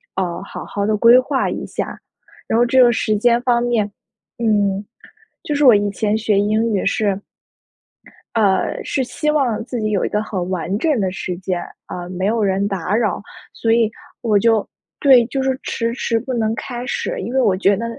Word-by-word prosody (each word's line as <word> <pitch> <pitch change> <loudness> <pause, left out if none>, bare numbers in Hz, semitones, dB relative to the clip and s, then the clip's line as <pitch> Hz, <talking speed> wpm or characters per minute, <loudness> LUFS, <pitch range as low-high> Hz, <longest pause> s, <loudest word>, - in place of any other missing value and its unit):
呃， 180 -2 -2
好 - - -8
好 200 0 -3
地 215 +1 +1
规 230 +3 +7
划 265 +1 0
一 - - -4
下。 - - -5 0.5
然 - - 0
后 240 - +5
这 255 +2 +4
个 240 - +5
时 215 -2 0
间 235 +2 +3
方 245 -2 +2
面， 225 -4 0 0.5
嗯， 205 -3 +1 0.6
就 300 - -3
是 290 +1 +2
我 250 -4 +8
以 205 0 +1
前 210 +1 0
学 215 -2 +1
英 215 +3 +1
语 195 - 0
是 200 -3 +1 1.2
呃， 200 -4 +1
是 270 - -1
希 300 +4 -1
望 255 -8 0
自 245 -3 -4
己 215 - 0
有 200 - +1
一 - - -2
个 210 - 0
很 185 -4 -4
完 185 +1 -2
整 295 +1 +1
的 190 -2 0
时 185 -1 -4
间， 180 -1 -3 0.3
啊， 175 -1 -6
没 185 +1 -3
有 220 +1 +1
人 195 0 +1
打 195 0 -2
扰。 215 -5 0 0.3
所 225 - -1
以 230 -2 +3 0.3
我 215 -3 +2
就 220 0 +2 0.3
对， 260 -4 +6
就 270 +2 -2
是 265 -1 -1
迟 230 0 -2
迟 230 -2 0
不 260 - -6
能 220 -2 0
开 240 +2 -6
始， 275 - -3
因 220 +6 -5
为 265 - +3
我 200 -6 +2
觉 200 +1 +3
得 230 +4 -4
220 Hz, 215 characters per minute, -19 LUFS, 200-240 Hz, 1.2 s, 我